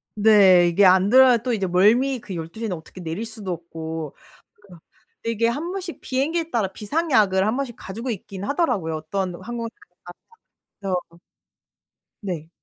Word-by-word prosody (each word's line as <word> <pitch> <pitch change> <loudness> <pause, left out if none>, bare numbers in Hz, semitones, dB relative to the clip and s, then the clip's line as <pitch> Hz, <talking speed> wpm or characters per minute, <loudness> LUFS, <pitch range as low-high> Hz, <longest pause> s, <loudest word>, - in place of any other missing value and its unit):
네 200 -4 +6
이게 175 +4 +4
안 185 +1 +5
들어야 255 0 +7
또 245 +2 -2
이제 195 -4 -1
멀미 230 +9 +3
그 205 -5 -8
12:00/ 170 +7 -6
에는 195 -5 -2
어떻게 160 +3 -12
내릴 170 +6 -4
수도 220 -4 -7
없고. 160 -2 -7 0.5
그니까 185 -5 -16 0.4
그 230 - -2
이게 230 0 +1
한 295 +9 -3
번씩 370 -3 -6
비행기에 320 +6 -1
따라 220 -8 0
비상약을 210 - +1
한 220 +3 0
번씩 265 -4 -4
가지고 230 +7 -6
있긴 195 -2 -6
하더라고요. 205 - 0
어떤 180 +4 -3
항공사에서나 230 +4 -6 1.1
그래서. 195 -3 -2 1.3
네. 170 -6 -5
205 Hz, 325 characters per minute, -23 LUFS, 180-240 Hz, 1.3 s, 들어야